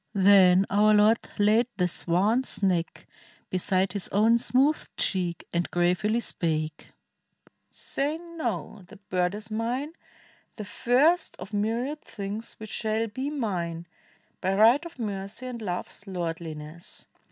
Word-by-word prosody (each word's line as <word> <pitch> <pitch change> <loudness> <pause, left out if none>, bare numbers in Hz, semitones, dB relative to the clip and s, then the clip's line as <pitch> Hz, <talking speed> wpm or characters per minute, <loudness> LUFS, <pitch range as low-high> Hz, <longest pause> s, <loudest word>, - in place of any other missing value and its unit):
Then 190 -1 +6
our 210 +2 +5
Lord 215 +2 +5 0.2
Laid 215 +3 +4
the 180 - +2
swan's 205 +9 +1
neck 175 -3 0 0.5
beside 185 0 +1
his 200 -3 -3
own 225 +4 +4
smooth 270 +6 +2
cheek 175 -4 -1
And 170 0 0
gravely 180 +6 +1
spake, 155 -7 -2 0.8
"Say 290 +3 -3
no! 320 - -5
the 210 - -13
bird 180 -1 -1
is 215 +1 -9
mine. 245 +8 -2 0.6
The 210 - -6
first 270 - +2
of 195 +4 -10
m} 205 - +1
riad 245 +8 -2
things 215 +1 -6
which 220 -1 -10
shall 220 0 -1
be 260 +6 -4
mine 175 - -3 0.6
By 190 +1 0
right 230 +9 +5
of 335 - -16
mercy 205 +1 -5
and 245 -2 -6
love's 190 0 -5
lordhness. 165 -2 -6
210 Hz, 130 wpm, -27 LUFS, 180-235 Hz, 0.8 s, Then